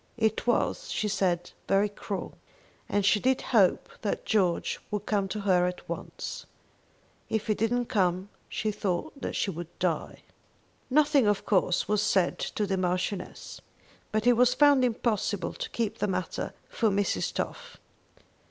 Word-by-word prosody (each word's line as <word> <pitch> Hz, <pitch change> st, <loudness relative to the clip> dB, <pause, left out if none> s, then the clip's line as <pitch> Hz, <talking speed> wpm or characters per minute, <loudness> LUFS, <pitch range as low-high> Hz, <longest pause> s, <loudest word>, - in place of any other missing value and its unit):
It 220 Hz, 0 st, 0 dB
was, 240 Hz, -, +1 dB
she 215 Hz, -, -1 dB
said, 175 Hz, -3 st, 0 dB, 0.2 s
very 195 Hz, +1 st, +3 dB
cruel, 200 Hz, -1 st, -6 dB, 0.5 s
and 205 Hz, -1 st, +1 dB
she 205 Hz, +1 st, +4 dB
did 260 Hz, +3 st, +2 dB
hope 205 Hz, -7 st, +3 dB
that 205 Hz, -, -2 dB
George 185 Hz, -6 st, +1 dB
would 210 Hz, -1 st, -3 dB
come 200 Hz, -2 st, +1 dB
to 210 Hz, +2 st, -4 dB
her 180 Hz, -3 st, +3 dB
at 180 Hz, 0 st, -6 dB
once. -, -, -6 dB, 0.8 s
If 220 Hz, -1 st, -1 dB
he 215 Hz, -, +2 dB
didn't 240 Hz, +3 st, 0 dB
come 190 Hz, -4 st, 0 dB, 0.2 s
she 215 Hz, -2 st, -1 dB
thought 200 Hz, +5 st, -3 dB
that -, -, -3 dB
she 195 Hz, -, 0 dB
would 170 Hz, -1 st, -6 dB
die. -, -, -2 dB, 0.7 s
Nothing, 285 Hz, -3 st, +4 dB
of 205 Hz, -1 st, +1 dB
course, 185 Hz, -3 st, +2 dB
was 210 Hz, 0 st, +2 dB
said 190 Hz, -4 st, +2 dB
to 210 Hz, -, -2 dB
the 195 Hz, -1 st, -1 dB
Marchioness, 185 Hz, +2 st, -3 dB, 0.5 s
but 215 Hz, +1 st, 0 dB
it 245 Hz, -, +7 dB
was 250 Hz, +1 st, +4 dB
found 290 Hz, -3 st, +6 dB
impossible 220 Hz, -4 st, 0 dB
to -, -, -5 dB
keep 225 Hz, -3 st, -2 dB
the -, -, +1 dB
matter 185 Hz, -1 st, -3 dB
from 215 Hz, -4 st, +1 dB
Mrs. 205 Hz, -, 0 dB
Toff. 485 Hz, 0 st, -5 dB
210 Hz, 155 wpm, -28 LUFS, 190-230 Hz, 0.8 s, it